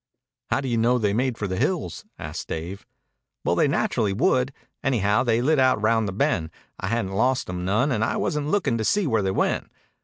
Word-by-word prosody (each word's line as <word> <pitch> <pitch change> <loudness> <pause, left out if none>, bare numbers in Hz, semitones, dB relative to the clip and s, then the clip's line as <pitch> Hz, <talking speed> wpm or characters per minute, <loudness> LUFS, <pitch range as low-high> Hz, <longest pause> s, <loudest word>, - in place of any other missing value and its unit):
"How - - +1
do 135 - -4
you 120 -2 0
know 120 +2 +3
they 105 -4 +1
made 125 +1 0
for 105 - -3
the 95 -1 -3
hills?" 145 - -1
asked - - -6
Dave. 85 +5 -6 0.6
"Well, - - +2
they - - +3
naturally 100 -3 0
would. 130 - +2 0.3
Anyhow, 110 -4 +2
they 120 -1 +1
lit 150 +2 +3
out 130 -4 +4
round 110 0 +2
the - - -2
Bend. 85 -4 0 0.3
I 95 - -3
hadn't 115 -3 -1
lost 125 +6 +1
'em 90 0 -4
none, 110 +9 +2
and 110 -3 +1
I - - 0
wasn't 150 -1 -1
lookin' 155 - +1
to - - 0
see 205 - +2
where 115 -7 +2
they 95 - 0
went. 95 - 0
115 Hz, 215 wpm, -24 LUFS, 100-130 Hz, 0.6 s, out